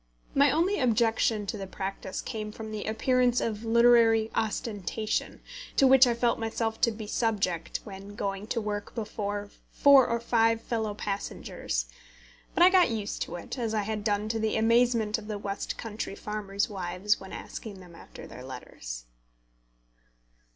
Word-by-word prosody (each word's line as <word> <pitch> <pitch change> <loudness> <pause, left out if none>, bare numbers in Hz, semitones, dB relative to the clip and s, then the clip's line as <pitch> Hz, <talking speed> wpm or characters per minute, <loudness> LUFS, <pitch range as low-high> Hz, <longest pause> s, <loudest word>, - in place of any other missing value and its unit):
My 280 +1 +5
only 335 +8 +2
objection 225 -3 +2
to 205 +1 -4
the 195 - -5
practice 190 0 -5
came 215 -3 -5
from 220 0 -8
the 215 -1 -4
appearance 245 +2 +2
of 215 -1 -2
literary 230 -1 +5
ostentation, 215 -1 -2 0.3
to 275 - +5
which 265 -1 +7
I 240 - +1
felt 235 0 +1
myself 225 0 -2
to 230 - +4
be 215 0 -7
subject 200 -7 -1
when 200 0 -10
going 200 0 -3
to 230 - -1
work 210 -1 -4
before 205 -2 -4 0.2
four 280 -3 +6
or 235 0 0
five 230 -1 +2
fellow 220 -2 -2
passengers. 195 - -3 0.7
But 345 - +5
I 365 - +8
got 370 -5 +5
used 215 -3 -3
to - - -3
it, 175 +9 -6
as 225 -2 -1
I 210 - +1
had 210 0 -3
done 210 0 0
to 225 0 -1
the 220 0 0
amazement 230 -1 +3
of 210 - -11
the 210 -1 -3
west 200 0 -4
country 215 -3 -5
farmers' 200 -1 -2
wives 190 +2 -1
when 190 - -10
asking 205 -4 -8
them 180 -2 -14
after - - -12
their 125 - -10
letters. - - -8
220 Hz, 165 wpm, -28 LUFS, 205-230 Hz, 0.7 s, I